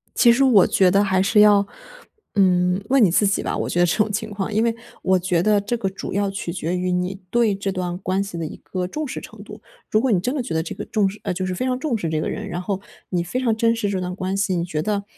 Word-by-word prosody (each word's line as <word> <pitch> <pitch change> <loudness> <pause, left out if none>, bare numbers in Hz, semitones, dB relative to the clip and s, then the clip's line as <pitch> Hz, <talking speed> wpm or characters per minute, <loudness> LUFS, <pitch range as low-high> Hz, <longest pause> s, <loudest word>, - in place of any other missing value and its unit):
其 240 - +6
实 250 +4 +3
我 230 -8 +6
觉 190 -2 +4
得 200 +2 +4
还 190 -2 +2
是 200 +3 +3
要， 205 -1 +6 0.7
嗯， 180 -1 +3
问 270 -2 +5
你 185 - +4
自 205 - +3
己 195 - +1
吧， - - -2
我 - - -2
觉 175 - -1
得 175 - +5
这 175 - +1
种 215 -1 +2
情 220 +2 -3
况。 195 -2 -3
因 215 +2 +2
为 230 -1 +1 0.3
我 190 0 +3
觉 175 -1 +1
得 210 0 +3
这 215 +4 -2
个 195 -4 -1
主 195 - -7
要 200 0 0
取 195 -3 -4
决 175 0 -2
于 180 0 -1
你 180 +2 -2
对 230 -3 +2
这 195 0 -3
段 180 -2 -3
关 190 +1 -1
系 195 -4 -7
的 165 - -3
一 - - -7
个 180 -1 -4
重 300 +9 -4
视 - - -5
程 - - -12
度。 - - -11 0.3
如 215 - +2
果 260 0 +1
你 195 - +3
真 245 +9 -2
的 280 - -1
觉 245 - -5
得 160 0 0
这 165 - -6
个 - - -6
重 205 -3 +1
视 205 +2 -10
呃， - - -1
就 185 +1 -3
是 185 - -2
非 250 - -2
常 255 -1 0
重 260 -5 -1
视 170 -6 -3
这 155 -1 -1
个 - - -2
人， 210 0 -5
然 175 -2 -4
后 195 +1 -3 0.3
你 175 -2 0
非 180 +9 -3
常 235 -4 +1
珍 230 +1 +2
视 220 -3 -1
这 195 -2 -1
段 180 0 -4
关 190 0 -3
系， 195 -1 0
你 170 - 0
觉 155 -3 -3
得， 205 +2 -1
195 Hz, 320 characters per minute, -22 LUFS, 180-215 Hz, 0.7 s, 其